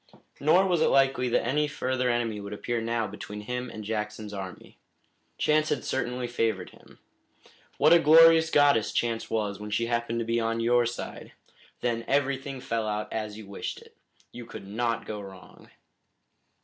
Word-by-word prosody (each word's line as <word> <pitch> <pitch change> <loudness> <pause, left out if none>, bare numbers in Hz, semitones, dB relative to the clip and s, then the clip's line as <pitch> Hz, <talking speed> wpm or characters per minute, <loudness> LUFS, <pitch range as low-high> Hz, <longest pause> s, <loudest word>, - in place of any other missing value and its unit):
Nor 165 +7 +4
was 175 -4 +1
it - - +4
likely 135 -2 +3
that 115 - +1
any 150 +5 +1
further 130 -3 -1
enemy 115 -3 -1
would 100 0 -7
appear 120 +3 -2
now 115 0 -1
between 105 +1 -7
him 125 +3 -4
and 110 - -8
Jackson's 105 0 -4
army. 95 -2 -8 0.6
Chance 155 0 +2
had 135 - -1
certainly 125 -1 -2
favored 115 -5 -1
him. - - -19 0.8
What 155 +3 +6
a 170 - +7
glorious 165 +1 +7
goddess 145 -8 +4
Chance 115 -1 -1
was 105 -3 -2
when 105 0 -7
she 115 +3 0
happened 120 0 -1
to 115 - -1
be 115 +1 0
on 115 0 -1
your 120 +1 +3
side! 120 - -7 0.5
Then 115 -1 -1
everything 135 -1 0
fell 115 -3 -2
out 105 0 -3
as 110 -1 -4
you 110 - -9
wished 100 0 -6
it. - - -19 0.4
You 120 -1 -9
could - - -9
not 115 +2 -2
go 105 -1 -5
wrong. 95 -2 -13
115 Hz, 175 wpm, -27 LUFS, 110-135 Hz, 0.8 s, a